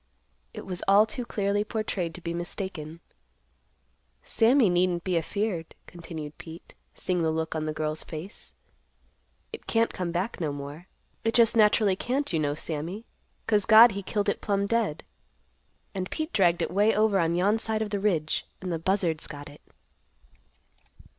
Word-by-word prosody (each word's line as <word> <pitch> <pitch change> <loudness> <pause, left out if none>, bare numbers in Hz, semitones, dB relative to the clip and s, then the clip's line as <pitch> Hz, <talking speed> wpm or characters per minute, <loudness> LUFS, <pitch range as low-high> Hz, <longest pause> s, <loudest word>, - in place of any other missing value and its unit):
It - - -8
was 180 -2 -5
all 200 +2 +6
too 245 +2 -5
clearly 205 -2 0
portrayed 210 -6 -3
to 180 - -9
be 170 0 -4
mistaken. 170 -2 -5 1.2
"Sammy 240 +1 +4
needn't 175 -1 +1
be 185 -2 -1
afeared," 170 0 -2
continued 160 -3 -8
Pete, 165 +1 -11 0.2
seeing 180 -2 -1
the 160 - +2
look 160 0 -2
on 155 -1 -2
the - - -1
girl's 155 0 -3
face. 165 +6 -9 1.0
"It - - -8
can't 230 0 +1
come 180 -2 -3
back 180 +4 -3
no 155 -3 0
more. 145 +5 -8 0.4
It 225 0 0
just 235 -1 +5
naturally 210 -2 +4
can't, 260 +4 -2
you 160 - +2
know, 145 -1 0
Sammy; 165 +8 -5 0.4
'cause 210 -3 +2
God 225 +1 +9
he 200 0 -4
killed 205 +2 -2
it 200 - 0
plumb 200 -1 0
dead. 210 -8 0 0.9
And 185 -2 -3
Pete 315 +1 -4
dragged 175 -3 +3
it - - -3
way 205 +4 +3
over 210 -2 +3
on 170 -1 +1
yon 200 +5 +2
side 220 -1 -1
of 210 - -6
the 205 - -1
ridge 170 -7 0
and 180 -2 -4
the 165 - -2
buzzards 170 -3 0
got 145 -2 -9
it." 145 - -16
185 Hz, 165 wpm, -27 LUFS, 165-210 Hz, 1.2 s, God